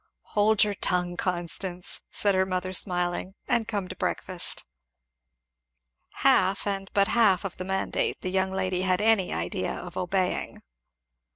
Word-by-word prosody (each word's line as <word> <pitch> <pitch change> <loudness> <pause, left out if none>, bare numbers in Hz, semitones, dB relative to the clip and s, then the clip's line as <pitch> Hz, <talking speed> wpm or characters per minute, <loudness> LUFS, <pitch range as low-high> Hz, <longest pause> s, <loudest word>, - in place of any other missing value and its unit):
"Hold 210 0 +4
your 210 -1 0
tongue, 180 -2 0
Constance," 180 +1 -2
said 200 -1 +1
her 190 0 +3
mother 185 0 -2
smiling, 180 0 0
"and 235 -4 +1
come 200 -4 -2
to - - -7
breakfast." - - -3 1.6
Half 200 -8 +4
and 195 -1 -2
but 200 +1 +4
half 210 -6 +4
of 190 - -5
the 185 - -5
mandate 190 0 -1
the 185 - -3
young 190 0 +1
lady 185 -1 -1
had 185 -1 +2
any 210 -3 +3
idea 85 +2 -2
of 175 -1 -8
obeying. 185 0 -1
190 Hz, 145 wpm, -27 LUFS, 180-200 Hz, 1.6 s, Hold